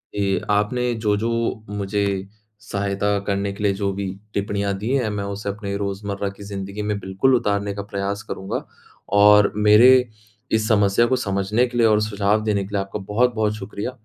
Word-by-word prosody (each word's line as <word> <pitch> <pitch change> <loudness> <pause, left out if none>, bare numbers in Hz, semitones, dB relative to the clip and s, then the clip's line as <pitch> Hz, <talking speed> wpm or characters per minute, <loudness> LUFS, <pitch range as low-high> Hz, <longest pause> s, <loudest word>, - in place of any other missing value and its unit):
ये 100 -2 +1
आपने 120 +4 +1
जो-जो 110 0 0 0.5
मुझे 100 +1 -1 0.6
सहायता 100 -2 -1
करने 100 0 0
के 100 - -7
लिए 100 -1 +3
जो 100 0 -1
भी 100 +1 -4 0.3
टिप्पणियाँ 100 0 -1
दी 105 +4 -4
हैं, 125 -5 0
मैं 105 -1 -3
उसे 100 +1 -4
अपने 100 0 -4
रोज़मर्रा 100 0 -3
की 100 +1 -12
ज़िंदगी 100 0 -6
में 105 0 -1
बिल्कुल 95 +8 +2
उतारने 100 -3 0
का 100 - -5
प्रयास 100 +1 -4
करूँगा। 95 -3 -5 0.6
और 105 0 +6
मेरे 105 +4 +7 0.6
इस 110 -1 +1
समस्या 105 +1 +3
को 130 - +2
समझने 105 0 0
के 120 0 -6
लिए 115 -1 +5
और 105 -1 +3
सुझाव 105 0 +1
देने 105 -2 0
के 95 - -9
लिए 100 - +1
आपका 95 +2 -5
बहुत-बहुत 110 -2 +2
शुक़्रिया। 105 +3 -5
105 Hz, 175 wpm, -22 LUFS, 100-110 Hz, 0.6 s, मेरे